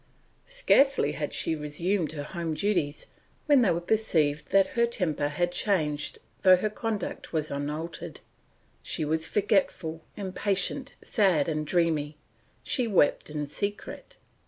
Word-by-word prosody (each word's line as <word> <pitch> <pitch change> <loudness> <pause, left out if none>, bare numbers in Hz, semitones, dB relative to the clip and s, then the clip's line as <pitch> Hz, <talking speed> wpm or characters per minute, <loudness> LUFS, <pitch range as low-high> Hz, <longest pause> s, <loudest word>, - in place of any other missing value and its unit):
Scarcely 280 - +3
had 150 0 -4
she 160 - 0
resumed 155 +3 -1
her 145 -2 -5
home 165 0 -4
duties 175 -7 0 0.4
when 290 -4 +5
they 225 - +4
perceived 160 -8 +1
that 195 -1 +4
her 235 0 +2
temper 170 -10 -1
had 175 +4 -1
changed 155 -6 0 0.2
though 185 -1 +8
her 210 +4 -1
conduct 215 -3 -4
was 155 -1 -1
unaltered, 155 +3 -5 0.6
she 155 - -2
was 160 +1 -1
forgetful, 185 -6 0 0.2
impatient, 200 +5 -1
sad, 185 -9 +2
and 155 -2 -2
dreamy; 155 -3 +1 0.5
she 250 -4 0
wept 185 -9 +2
in 150 -1 -3
secret. 200 +8 -5
170 Hz, 130 wpm, -27 LUFS, 150-205 Hz, 0.6 s, though